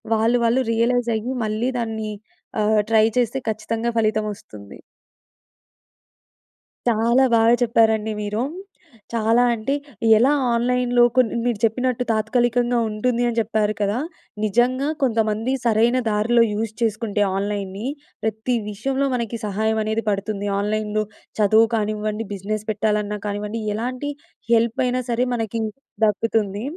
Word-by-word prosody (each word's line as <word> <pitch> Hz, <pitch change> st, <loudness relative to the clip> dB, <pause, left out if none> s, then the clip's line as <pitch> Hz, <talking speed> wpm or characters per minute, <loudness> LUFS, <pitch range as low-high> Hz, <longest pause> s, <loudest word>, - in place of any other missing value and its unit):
వాళ్ళు 230 Hz, +3 st, +2 dB
వాళ్ళు 245 Hz, +3 st, +2 dB
రియలైజ్ 240 Hz, +1 st, +1 dB
అయ్యి 240 Hz, +4 st, -3 dB
మళ్ళీ 215 Hz, +4 st, -1 dB
దాన్ని 220 Hz, -2 st, -3 dB, 0.5 s
ఆహ్, 215 Hz, 0 st, +3 dB
ట్రై 220 Hz, -1 st, +5 dB
చేస్తే 245 Hz, +2 st, +1 dB
ఖచ్చితంగా 225 Hz, +2 st, -2 dB
ఫలితం 215 Hz, -1 st, +1 dB
వస్తుంది. 100 Hz, -, -13 dB, 2.1 s
చాలా 235 Hz, +3 st, +3 dB
బాగా 225 Hz, +1 st, +5 dB
చెప్పారండి 220 Hz, -2 st, +2 dB
మీరు. 210 Hz, +2 st, -2 dB, 0.7 s
చాలా 230 Hz, +1 st, +3 dB
అంటే, 235 Hz, +5 st, -2 dB, 0.4 s
ఎలా 250 Hz, +6 st, +4 dB, 0.2 s
ఆన్‌లైన్‌లో 245 Hz, +1 st, +2 dB
కొన్ని 245 Hz, -3 st, +3 dB
మీరు 235 Hz, -4 st, 0 dB
చెప్పినట్టు 250 Hz, +2 st, +1 dB
తాత్కాలికంగా 240 Hz, +2 st, +1 dB
ఉంటుంది 235 Hz, +3 st, 0 dB
అని 235 Hz, -, -4 dB
చెప్పారు 215 Hz, -1 st, 0 dB
కదా! 205 Hz, +4 st, 0 dB, 0.4 s
నిజంగా 245 Hz, +6 st, +2 dB, 0.2 s
కొంతమంది 225 Hz, -1 st, +1 dB
సరైన 235 Hz, +2 st, +3 dB
దారిలో 215 Hz, +3 st, +3 dB
యూస్ 220 Hz, +1 st, -3 dB
చేసుకుంటే 215 Hz, -2 st, 0 dB
ఆన్‌లైన్నీ, 200 Hz, +1 st, -3 dB, 0.4 s
ప్రతి 220 Hz, +3 st, -1 dB
విషయంలో 265 Hz, +7 st, -1 dB
మనకి 235 Hz, -1 st, -3 dB
సహాయం 220 Hz, +2 st, 0 dB
అనేది 220 Hz, +1 st, -1 dB
పడుతుంది. 200 Hz, 0 st, -2 dB
ఆన్‌లైన్‌లో 215 Hz, +1 st, -1 dB, 0.4 s
చదువు 220 Hz, +2 st, +5 dB
కానివ్వండి, 215 Hz, 0 st, -2 dB
బిజినెస్ 210 Hz, +2 st, -4 dB
పెట్టాలన్నా 210 Hz, 0 st, -1 dB
కానివ్వండి, 210 Hz, +2 st, -3 dB
ఎలాంటి 255 Hz, +6 st, -3 dB, 0.4 s
హెల్ప్ 230 Hz, 0 st, +2 dB
అయినా 250 Hz, +1 st, 0 dB
సరే 245 Hz, +2 st, +1 dB
మనకి 225 Hz, 0 st, -2 dB, 0.4 s
దక్కుతుంది. 210 Hz, -1 st, 0 dB
220 Hz, 120 wpm, -22 LUFS, 215-240 Hz, 2.1 s, ట్రై